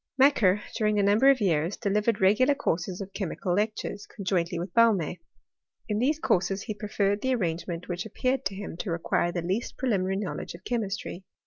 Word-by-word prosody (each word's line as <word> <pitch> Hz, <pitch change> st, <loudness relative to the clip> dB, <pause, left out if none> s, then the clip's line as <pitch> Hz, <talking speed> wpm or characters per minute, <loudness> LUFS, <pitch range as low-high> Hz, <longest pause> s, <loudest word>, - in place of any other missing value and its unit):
Macquer, 225 Hz, -8 st, +4 dB
during 215 Hz, -1 st, +1 dB
a 205 Hz, -, +3 dB
number 210 Hz, +7 st, +5 dB
of 275 Hz, -2 st, +5 dB
years, 170 Hz, -3 st, +1 dB
delivered 210 Hz, +2 st, +1 dB
re 190 Hz, +1 st, +5 dB
gular 260 Hz, +4 st, +3 dB
courses 180 Hz, -, -2 dB
of 195 Hz, 0 st, -7 dB
chemical 185 Hz, -2 st, -2 dB
lectures, 210 Hz, 0 st, -2 dB
conjointly 175 Hz, -3 st, -1 dB
with 175 Hz, +2 st, -5 dB
Baum6. 210 Hz, -8 st, +3 dB, 0.7 s
In 210 Hz, 0 st, 0 dB
these 285 Hz, +6 st, +2 dB
courses 195 Hz, -, 0 dB
he 215 Hz, -, -4 dB
preferred 205 Hz, -1 st, -1 dB
that 260 Hz, -, 0 dB
arrange 175 Hz, -8 st, -1 dB
ment 170 Hz, -1 st, -5 dB
which 180 Hz, +4 st, -3 dB
appeared 255 Hz, +5 st, -1 dB
to 190 Hz, 0 st, -1 dB
him 200 Hz, -3 st, -6 dB
to 185 Hz, -, -4 dB
require 170 Hz, +1 st, 0 dB
the 175 Hz, -1 st, -3 dB
least 190 Hz, +7 st, -2 dB
pre 260 Hz, -2 st, 0 dB
liminary 190 Hz, -1 st, 0 dB
knowledge 195 Hz, -3 st, -4 dB
of 175 Hz, -, -14 dB
chemistry. 200 Hz, -5 st, -3 dB
200 Hz, 195 wpm, -27 LUFS, 180-220 Hz, 0.7 s, number